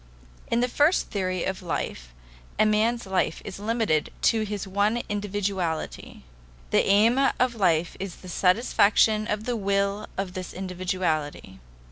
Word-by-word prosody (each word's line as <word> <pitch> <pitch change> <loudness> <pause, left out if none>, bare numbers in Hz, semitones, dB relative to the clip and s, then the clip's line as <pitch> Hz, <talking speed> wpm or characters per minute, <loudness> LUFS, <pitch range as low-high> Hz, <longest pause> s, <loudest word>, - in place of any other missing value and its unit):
In 235 - +1
the 250 - +2
first 295 +8 +2
theory 185 -4 -1
of 190 0 -3
life 60 - -4 0.5
a 215 - +4
man's 220 +2 +1
life 190 -1 0
is 195 -1 -7
limited 215 -8 0
to 225 - +3
his 210 -2 -4
one 205 +5 +1
individuality; 200 -5 -3 0.5
the - - +4
aim 215 +6 +4 0.2
of 255 -1 +2
life 175 -6 +1
is 190 -2 -5
the 185 - -13
satisfaction 215 +3 +3
of 210 0 -2
the 245 +1 -2
will 200 0 0
of 190 -2 -3
this 185 -2 -6
individuality. 180 - -3
200 Hz, 140 wpm, -26 LUFS, 185-215 Hz, 0.5 s, a